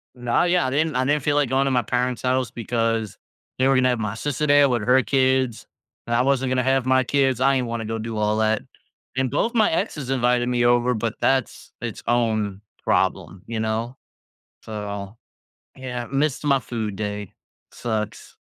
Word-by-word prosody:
Nah, 120 +2 +1
yeah, 175 -2 +2
I - - 0
didn't 155 +3 0
I 130 +1 +1
didn't 145 +1 +1
feel 145 0 +1
like 145 -3 +2
going 135 +1 +2
to 135 - +1
my 125 -1 +3
parents' 125 +2 -1
house, 130 -2 0
because, 115 -3 -2 0.4
they 130 - +4
were 135 - +4
gonna 130 0 +3
have 125 - +1
my 105 -2 -2
sister 145 +5 -2
there 145 -1 +5
with 120 -4 0
her 125 +3 +4
kids, 130 -2 +1 0.4
and 120 - -1
I 120 - +4
wasn't 135 -1 +1
gonna 130 0 +2
have 130 0 +2
my 130 0 +3
kids, 135 -1 +1
I 135 +1 +4
ain't 130 -2 0
wanna 115 -1 -3
go 115 +1 -3
do 110 0 -5
all 105 0 +1
that, 110 0 +1 0.6
and 130 -1 0
both 225 - 0
my 220 -2 +4
exes 150 -4 -2
invited 125 -1 +2
me 125 -1 +1
over, 120 +1 +3
but 115 0 -2
that's 135 -2 0
its - - -5
own 110 -4 0 0.2
problem, 90 +1 0
you 115 -1 -3
know? 110 +3 -2 0.7
So, 100 -1 -6 0.6
yeah, 125 -2 -5
missed 140 +1 0
my 140 -2 +3
food 110 -5 -4
day. 105 -1 -4 0.4
Sucks. 110 -3 -4
125 Hz, 190 wpm, -23 LUFS, 110-130 Hz, 0.7 s, there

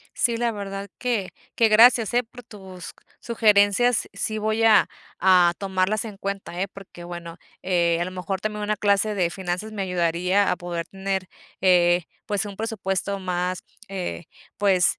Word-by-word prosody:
Sí, 235 -2 +1
la 235 0 0
verdad 200 -1 -6
que 230 -7 -1 0.2
que 230 - +4
gracias, 230 +1 +6
eh, 245 - +4
por 245 +2 -13
tus 190 -5 -11 0.3
sugerencias. 220 +1 +3
Sí 215 +2 -3
voy 220 +1 0
a 220 -2 +6 0.3
a 180 -2 +5
tomarlas 195 +2 0
en 215 -3 -8
cuenta, 195 -3 -5
eh, 195 - -1
porque 190 -3 -12
bueno, 170 -1 -8 0.3
eh, 170 -2 +2
a - - +1
lo 185 - -5
mejor 185 +1 -4
también 210 +1 -3
una 210 0 0
clase 205 +1 +1
de 180 -4 +1
finanzas 185 +4 -4
me 205 -2 -3
ayudaría 180 +2 +1
a 180 - 0
poder 175 -2 -5
tener, 190 -1 -3 0.3
eh, 175 -1 +4 0.2
pues, 205 -1 -1
un 200 -1 -8
presupuesto 200 -2 -2
más 180 -1 -2 0.3
eh, 185 -3 -5 0.3
pues, 190 -3 +3
195 Hz, 165 wpm, -24 LUFS, 180-215 Hz, 0.3 s, gracias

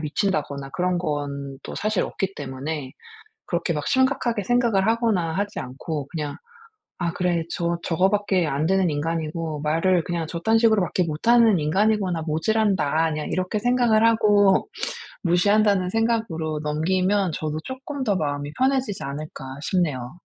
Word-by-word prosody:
미친다거나 150 -4 -2
그런 180 +2 0
건 140 -4 -4
또 - - -7
사실 215 -2 0
없기 195 0 -3
때문에 135 0 -5 0.5
그렇게 170 -1 -1
막 150 -1 -3
심각하게 260 -5 +1
생각을 235 -4 +2
하거나 225 -8 +1
하지 205 +2 -2
않고 140 +3 -5
그냥 150 -2 -4 0.6
'아 170 -2 -1
그래. 175 -2 0
저 170 -1 -1
저거 180 +3 +2
밖에 200 -4 +1
안되는 175 +7 +1
인간이고 160 0 -2
말을 165 +3 +2
그냥 170 -2 -2
저딴 180 +8 +1
식으로 220 -4 +4
밖에 180 +1 0
못하는 220 +6 +4
인간이구나. 190 +1 +1
모지란다.' 160 -2 +1
그냥 150 0 -3
이렇게 185 +3 -1
생각을 240 -2 +3
하고 210 - +4 0.6
무시한다는 195 +2 +3
생각으로 200 -9 -1
넘기면 185 +5 +1
저도 155 0 -3
'쪼끔 265 +2 -5
더 205 -6 +1
마음이 145 -3 -2
편해지지 260 -6 0
않을까?' 145 +1 -6 0.2
싶네요. 155 -5 -1
180 Hz, 335 characters per minute, -23 LUFS, 155-210 Hz, 0.6 s, 식으로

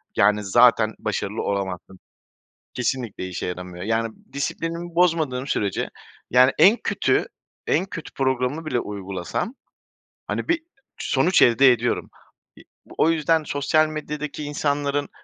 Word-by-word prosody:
yani, 105 +1 +3
zaten 115 +1 +4
başarılı 105 0 -3
olamazsın. 95 -1 -4 0.7
Kesinlikle 125 -6 -2
işe 90 -1 -5
yaramıyor. 90 0 -6
Yani, 115 +1 0 0.2
disiplinimi 165 +4 -4
bozmadığım 160 -7 +1
sürece, 100 -8 -1 0.4
yani, 125 +2 +6
en 210 +5 +7
kötü, - - +1 0.4
en - - +2
kötü 170 -4 -8
programını 130 +3 -1
bile 140 -5 0
uygulasam, 100 - -4 0.7
hani, - - -3
bir 335 -1 +1 0.4
sonuç 160 +7 +2
elde 130 +2 +6
ediyorum. 120 0 -1 0.5
İ - - -15 0.3
o 160 - +4
yüzden 160 0 +2
sosyal 150 +2 +2
medyadaki 150 -1 -5
insanların 145 -1 -1
130 Hz, 120 wpm, -23 LUFS, 105-155 Hz, 0.7 s, en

